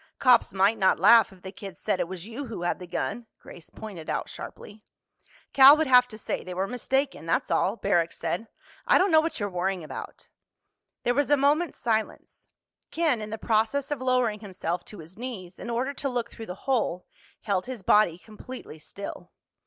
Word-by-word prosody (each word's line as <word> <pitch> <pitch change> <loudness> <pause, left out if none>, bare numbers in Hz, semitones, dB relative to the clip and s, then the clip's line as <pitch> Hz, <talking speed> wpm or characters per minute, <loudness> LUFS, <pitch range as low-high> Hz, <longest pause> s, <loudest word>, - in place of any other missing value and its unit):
"Cops 250 -3 +4
might 195 +3 +2
not 190 - +4
laugh 215 +4 +6
if 185 -2 -18
the 190 - -7
kids 195 -2 -10
said 185 - -1
it - - 0
was 185 0 -7
you 245 +5 -6
who 215 -6 -6
had 175 - -1
the 180 - -9
gun," 215 +6 -3
Grace 170 - -13
pointed 195 -8 -9
out - - -2
sharply. 210 +1 -10 0.7
"Cal 275 +2 +9
would 315 - +1
have 250 -2 +6
to 220 -3 -11
say - - -4
they 180 - -7
were 190 +2 0
mistaken, 265 - -2
that's - - 0
all," 195 - +2
Barrack 175 -6 +1
said. 210 +7 -4 0.4
"I - - +6
don't 380 0 +3
know 315 -1 +6
what 320 -2 -3
you're 205 - -1
worrying 185 -1 -2
about." 155 - -8 0.8
There 245 - +2
was 285 +2 +1
a 290 - +5
moment's 295 +4 +1
silence. 220 -2 -3 0.4
Ken, 310 -9 +1
in 215 - -6
the 220 - -4
process 225 +6 0
of 285 -3 -2
lowering 250 -4 +1
himself 180 -4 -4
to 210 - -12
his 170 +4 -13
knees 195 -8 -7
in - - -7
order 250 +4 -1
to 280 0 -3
look 240 -2 -3
through 225 -1 -9
the 180 - -6
hole, 230 -9 0 0.4
held 195 -2 -1
his 250 -6 -6
body 185 -4 +4
completely 215 -3 -11
still. 200 +6 -9
220 Hz, 200 wpm, -26 LUFS, 185-255 Hz, 0.8 s, Cal